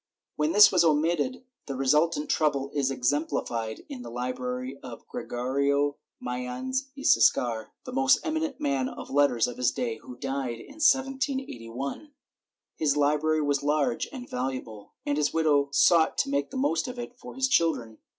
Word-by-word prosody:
When 150 +1 +1
this 210 +3 +8
was 180 -2 +4
omitted 165 - +1 0.2
the 135 - -4
resultant 150 +3 +2
trouble 140 -3 0
is 140 -2 +1
exemplified 125 -4 -1
in 275 -4 -7
the - - -8
library 125 +2 -4
of 120 -2 -10
Gre - - -5
gorio 140 +3 0 0.2
Mayans 125 - -3
y 275 - -7
Siscar, 115 - +3 0.2
the - - -8
most 135 0 +4
eminent 315 -3 -2
man 135 -2 0
of - - -9
letters 140 -5 +3
of 125 -1 -6
his 125 -1 +2
day, 115 -2 -3
who 125 - -11
died 135 -2 -3
in 285 - -12
1781. 265 - -1 0.6
His 150 -2 +1
library 150 +2 +2
was 145 -1 +1
large 150 - 0
and 255 -4 -8
valuable, 125 -5 -5
and 145 +1 0
his 145 - +1
widow 145 -3 +3
sought 160 +3 +4
to - - +1
make 140 0 0
the - - -6
most 270 0 +1
of 250 0 -6
it 240 0 -7
for - - -11
his 265 0 +1
children. 155 - +1
145 Hz, 165 wpm, -27 LUFS, 125-170 Hz, 0.6 s, this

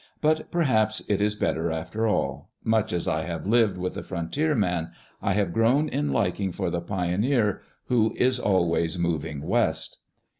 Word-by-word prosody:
But 155 +1 +1
perhaps 110 -10 +1
it 100 -1 +1
is 105 0 +1
better 85 -5 0
after 90 +8 -2
all? 105 - -1
Much 110 -2 +1
as 85 -1 -1
I 80 - +1
have 85 -2 -5
lived 110 -2 +3
with 90 0 -3
the - - -5
frontier 140 - -1
man, 90 -7 0 0.3
I 100 - +1
have 100 -3 0
grown 125 - +3
in 75 - -1
liking 95 +7 0
for 85 - -2
the 85 0 -1
pioneer 105 +5 0 0.2
who 115 -3 +2
is 130 0 +2
always 85 -4 +1
"moving 80 -4 -2
West." - - 0
100 Hz, 165 wpm, -26 LUFS, 85-115 Hz, 0.3 s, lived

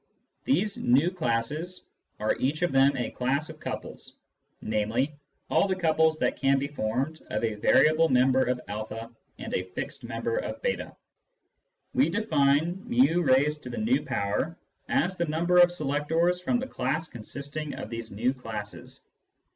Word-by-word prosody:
These 210 -6 +1
v 140 +9 +3
classes 155 +3 -2 0.4
are 105 +1 +1
each 150 +6 0
of 175 - +2
them 135 +1 +4
a 120 - -2
class 140 +5 -1
of 155 - -14
couples, - - -7 0.4
namely, 110 +7 -1 0.3
all - - +3
the 190 - 0
couples 160 -3 +2
that - - 0
can 135 0 +4
be 135 - -1
formed 140 +3 -2
of - - -2
a 110 -1 +1
variable 155 +9 +4
member 130 +1 +4
of 125 0 0
a 110 +2 -6 0.3
and - - -7
a - - +1
fixed 90 0 -7
member 460 - -2
of - - -3
j8. - - -2 1.0
We 265 - +3
define 160 -4 +2
jtt" 145 - +1 0.4
as 185 +2 +1
the 170 - +1
number 170 +3 +1
of 175 0 +7
selectors 165 +3 0
from 245 +7 +1
the 255 - -3
class 155 - -2
consisting 140 +6 -6
of 110 - -7
these 115 -1 -5
v 115 +6 0
classes. 110 -5 -8
145 Hz, 145 wpm, -27 LUFS, 125-170 Hz, 1.0 s, of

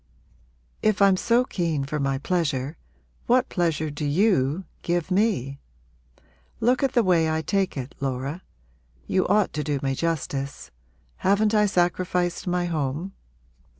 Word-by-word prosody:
If 215 -2 +2
I'm 195 -1 +6
so 235 +6 +2
keen 165 - -1
for 150 +2 -3
my 135 -1 0
pleasure 145 -3 -1 0.5
what 250 +1 +3
pleasure 160 -4 0
do 145 +1 -6
you 160 0 +2 0.2
give 175 +1 -1
me? 185 - +1 1.0
Look 250 +2 +2
at 270 -2 +1
the 240 - +4
way 170 -4 +3
I 160 0 -1
take 195 0 0
it, 130 0 -5
Laura. 135 +5 -3 0.6
You 185 - +1
ought 205 0 +2
to 150 - -2
do 145 -2 -1
me 135 -1 0
justice. 140 - -3 0.5
Haven't 205 +3 +2
I 210 -1 +4
sacrificed 180 -1 0
my 180 0 0
home? 160 +2 -2
175 Hz, 140 wpm, -25 LUFS, 145-195 Hz, 1.0 s, I'm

